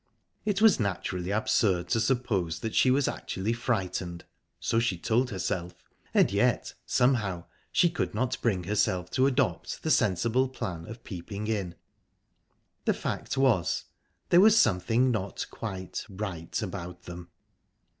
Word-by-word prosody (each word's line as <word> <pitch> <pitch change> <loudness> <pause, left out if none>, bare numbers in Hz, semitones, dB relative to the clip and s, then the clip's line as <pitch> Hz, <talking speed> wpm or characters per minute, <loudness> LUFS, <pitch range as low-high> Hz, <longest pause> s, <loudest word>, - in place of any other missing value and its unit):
It 205 0 +1
was 220 -9 +6
naturally 90 -3 -2
absurd 100 -3 +2
to 115 - +2
suppose 110 -9 0
that 110 - -3
she 130 - +4
was 135 +2 +3
actually 100 +5 -2
frightened 95 -7 -2 0.3
so 115 - +1
she 115 -6 0
told 120 +8 +1
herself 90 -2 -3 0.4
and - - +4
yet, - - +1
somehow, 105 -9 +2 0.3
she 175 - +4
could 170 -9 -2
not 125 +2 -1
bring 95 -7 +1
herself 90 -2 0
to 130 +1 +3
adopt 130 - -1
the - - 0
sensible 115 +7 +2
plan 90 -10 -5
of 115 +2 -9
peeping 100 +2 -6
in...The 100 -6 -6
fact - - -3
was, 125 -10 +2 0.5
there 175 - +7
was 220 +2 +7
something 115 - +3
not 100 -4 -3
quite 95 -5 -5
right 95 -5 -4
about 90 -2 -6
them. 85 -1 -9
105 Hz, 135 wpm, -28 LUFS, 90-125 Hz, 0.5 s, there